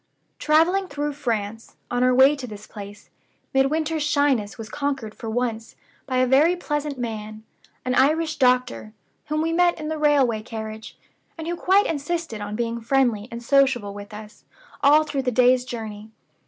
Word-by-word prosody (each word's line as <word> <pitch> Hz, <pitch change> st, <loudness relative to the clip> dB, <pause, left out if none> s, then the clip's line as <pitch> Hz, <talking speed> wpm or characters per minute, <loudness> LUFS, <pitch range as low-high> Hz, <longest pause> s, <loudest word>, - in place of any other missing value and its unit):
"Traveling 340 Hz, +6 st, +3 dB
through 290 Hz, -2 st, -3 dB
France, 225 Hz, -5 st, -4 dB, 0.2 s
on 245 Hz, 0 st, 0 dB
our 255 Hz, -, +4 dB
way 265 Hz, +3 st, +6 dB
to 265 Hz, -3 st, -7 dB
this 210 Hz, -1 st, -10 dB
place, 205 Hz, 0 st, -11 dB, 0.4 s
Midwinter's 305 Hz, +4 st, +1 dB
shyness 285 Hz, -8 st, +1 dB
was 225 Hz, -2 st, -7 dB
conquered 270 Hz, -4 st, -3 dB
for 225 Hz, -, -7 dB
once, 225 Hz, -1 st, -3 dB, 0.3 s
by 260 Hz, -2 st, -1 dB
a 255 Hz, -, +4 dB
very 290 Hz, +7 st, +4 dB
pleasant 295 Hz, -4 st, -3 dB
man 215 Hz, -2 st, -6 dB, 0.4 s
an 255 Hz, -, 0 dB
Irish 310 Hz, +5 st, +2 dB
doctor 250 Hz, -4 st, +1 dB, 0.3 s
whom 305 Hz, +1 st, 0 dB
we 330 Hz, 0 st, -1 dB
met 350 Hz, 0 st, +3 dB
in 305 Hz, 0 st, -4 dB
the 315 Hz, -1 st, -3 dB
railway 275 Hz, -7 st, +3 dB
carriage, 220 Hz, -1 st, -8 dB, 0.4 s
and 320 Hz, 0 st, -6 dB
who 345 Hz, -, -1 dB
quite 385 Hz, +4 st, +3 dB
insisted 315 Hz, -6 st, -3 dB
on 205 Hz, 0 st, -5 dB
being 235 Hz, 0 st, -2 dB
friendly 235 Hz, -3 st, +1 dB
and 235 Hz, +1 st, -8 dB
sociable 260 Hz, -6 st, +2 dB
with 205 Hz, 0 st, -10 dB
us 210 Hz, +1 st, -11 dB, 0.4 s
all 295 Hz, +2 st, +6 dB
through 280 Hz, -3 st, -2 dB
the 255 Hz, -1 st, -1 dB
day's 250 Hz, +1 st, +4 dB
journey. 220 Hz, -3 st, -7 dB
255 Hz, 170 wpm, -23 LUFS, 220-295 Hz, 0.4 s, way